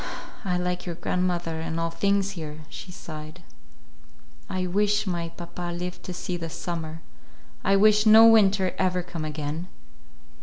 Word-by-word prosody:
"I 180 -3 0
like 180 0 -2
your 170 - -3
grandmother, 175 -2 -1
and 160 0 -3
all 165 0 -1
things 200 +2 +1
here," 155 -4 -7
she 185 - -9
sighed. 155 0 -9 1.1
"I 185 -1 -1
wish 205 +3 +2
my 170 -3 -2
papa 175 +1 -6
live 180 +1 -5
to - - -6
see 180 0 -3
this 165 -2 -6
summer. 165 -2 -5 0.6
I 195 - +4
wish 210 +2 +5
no 220 +1 +9
winter 200 -4 +5
ever 185 -1 +1
come 170 -2 -6
again." 155 +3 -4
180 Hz, 150 wpm, -26 LUFS, 165-195 Hz, 1.1 s, no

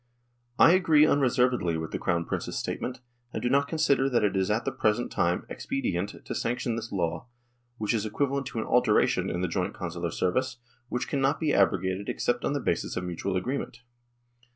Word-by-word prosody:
I 165 - +7
agree 165 -5 +5
unreservedly 125 - +2
with 80 -1 -5
the - - -3
Crown 85 -1 0
Prince's - - -3
statement, 125 0 -4 0.3
and - - -4
do 120 - +1
not 140 +1 +3
consider 140 -4 +2
that 120 -4 +2
it 100 -1 +1
is 95 -1 +1
at 110 +3 0
the - - 0
present 110 +3 0
time 85 +1 0
expedient 100 -7 -3
to - - -4
sanction 120 0 -1
this 115 0 -5
law, 85 0 -2 0.5
which 110 0 -1
is 110 -3 0
equivalent 135 +5 -1
to 130 - -7
an 110 - -1
alteration - - +3
in 85 - -2
the 90 - +1
joint 90 +2 -2
consular 85 -1 -4
service, 125 +10 -1 0.3
which 125 - -2
cannot 135 0 +1
be 155 -3 +1
abrogated 95 0 +1
except 120 0 -1
on - - 0
the 145 - 0
basis 85 - -1
of 90 - -2
mutual 90 +2 -2
agreement. 125 +3 -4
115 Hz, 190 wpm, -27 LUFS, 90-135 Hz, 0.5 s, I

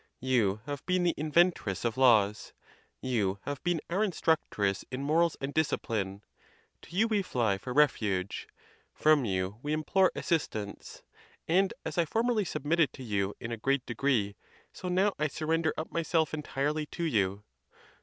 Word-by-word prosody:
You 115 -6 +1
have 145 -1 -5
been 180 -1 +2
the 175 -1 +2
inven 170 +4 +3
tress 95 - -5
of 115 -1 0
laws; 110 -5 +3 0.5
you 105 -7 0
have 145 -2 -4
been 175 -2 +1
our 185 +5 0
instructress 155 - 0
in 130 +2 -4
morals 165 +3 +2
and 135 +1 -4
discipline; 105 -10 -1 0.6
to 170 - -12
you 220 +4 +3
we 215 -3 +1
fly 115 - 0
for 95 - -6
refuge; 105 -10 +1 0.5
from 155 -4 +4
you 95 +1 -2
we 150 +2 -2
im 155 0 -1
plore 190 +4 +4
assistance; 110 -11 -3 0.4
and 185 +3 +3
as - - -2
I 170 - +3
formerly 225 +3 +1
submitted 155 0 +1
to 130 - -9
you 100 -3 -1
in 115 - -6
a 115 - -3
great 135 +3 0
degree, 115 -4 0 0.4
so 185 - -7
now 190 +3 +2
I 150 - +2
surrender 160 +2 0
up 160 - -4
myself 165 -1 0
entirely 150 0 -2
to 170 - -5
you. 100 - 0
145 Hz, 165 wpm, -30 LUFS, 110-165 Hz, 0.6 s, from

